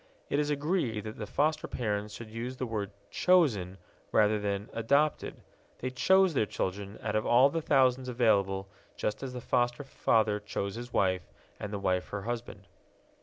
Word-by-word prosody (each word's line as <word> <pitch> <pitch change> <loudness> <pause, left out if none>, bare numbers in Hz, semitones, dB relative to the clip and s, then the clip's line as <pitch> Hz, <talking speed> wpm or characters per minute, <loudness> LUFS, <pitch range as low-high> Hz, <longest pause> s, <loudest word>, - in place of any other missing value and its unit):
It 145 - +2
is 150 0 0
agreed 145 - 0
that 110 0 -7
the 105 - -4
foster 155 +6 0
parents 105 -3 -3
should 115 -2 -9
use 120 +3 -5
the 130 - -2
word 105 -4 -3 0.2
"chosen" 115 - +3 0.3
rather 105 0 +4
than 100 0 -2
"adopted" 140 +7 +1 0.3
they 130 - -4
chose 190 +7 +4
their 110 -6 +1
children 100 +2 -4
out 105 -1 -1
of 110 - 0
all 130 +4 +6
the 165 - -1
thousands 130 -3 +3
available, 100 -5 +2 0.3
just 105 - -2
as 130 -2 -5
the 125 - -5
foster 120 +3 0
father 110 -5 +1
chose 100 -1 -4
his 120 +1 -7
wife, 95 -4 0 0.3
and 105 - -5
the 105 - -2
wife 95 -2 0
her 100 -1 -4
husband. 120 +1 -5
115 Hz, 170 wpm, -30 LUFS, 105-130 Hz, 0.3 s, all